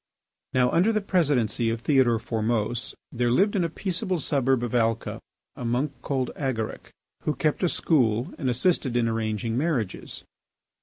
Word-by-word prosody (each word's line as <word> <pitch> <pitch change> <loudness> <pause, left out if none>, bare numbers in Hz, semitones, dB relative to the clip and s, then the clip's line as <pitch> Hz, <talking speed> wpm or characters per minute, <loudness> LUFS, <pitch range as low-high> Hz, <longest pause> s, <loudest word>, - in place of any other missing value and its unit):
Now, 125 -1 +4
under 185 +7 +3
the 215 - +1
Presidency 140 - +1
of 115 0 -2
Theodore 125 -3 +3
Formose, 115 +1 -2 0.2
there 120 -1 0
lived 195 - +3
in 185 - +2
a 165 - 0
peaceable 185 +2 -2
suburb 135 -5 +1
of 120 - -3
Alca 115 -1 0 0.4
a - - -7
monk 125 +5 0
called 130 -3 -1
Agaric, 125 -6 -3 0.3
who 150 - -1
kept 150 +3 0
a 180 - +3
school 120 -9 +1
and 135 -5 0
assisted 125 -1 +1
in 120 -1 +2
arranging 115 0 -1
marriages. 135 - -2
125 Hz, 155 wpm, -26 LUFS, 115-155 Hz, 0.4 s, Now